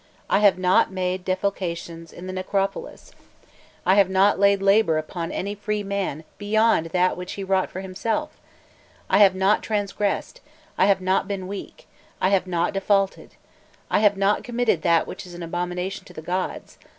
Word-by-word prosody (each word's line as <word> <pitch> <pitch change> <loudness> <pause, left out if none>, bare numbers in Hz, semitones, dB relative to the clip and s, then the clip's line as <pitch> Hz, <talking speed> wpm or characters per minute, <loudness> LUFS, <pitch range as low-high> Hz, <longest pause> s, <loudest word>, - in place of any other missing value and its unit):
I - - +4
have 205 -3 +5
not 185 +1 +3
made 185 0 -2
defalcations 175 -3 -3
in 175 - -10
the 185 - -5
necropolis! 195 - -3 0.7
I 185 - +5
have 195 -1 +4
not 190 +1 +3
laid 200 0 +4
labour 195 -4 +3
upon 165 +2 -4
any 200 +2 -3
free 210 0 -3
man 195 -6 -3 0.2
beyond 215 -4 +2
that 180 +2 +1
which 180 0 -6
he 200 - -5
wrought 190 -1 +1
for 185 - -6
himself! 225 +10 -3 0.8
I 195 - +5
have 195 -2 +6
not 190 +3 +2
transgressed, 205 -1 -2 0.3
I - - +3
have 195 -2 +3
not 190 +1 +1
been 195 -2 -4
weak, 200 0 -8 0.3
I 185 - +2
have 195 -2 +2
not 175 0 0
defaulted, 195 0 0 0.6
I - - +3
have 205 -1 +3
not 200 +1 +1
committed 240 -7 0
that 170 -1 +3
which - - -8
is 175 - -10
an 175 - -7
abomination 180 +2 -3
to 180 - -14
the 155 - -8
gods. 185 +3 -4
190 Hz, 175 wpm, -23 LUFS, 180-200 Hz, 0.8 s, have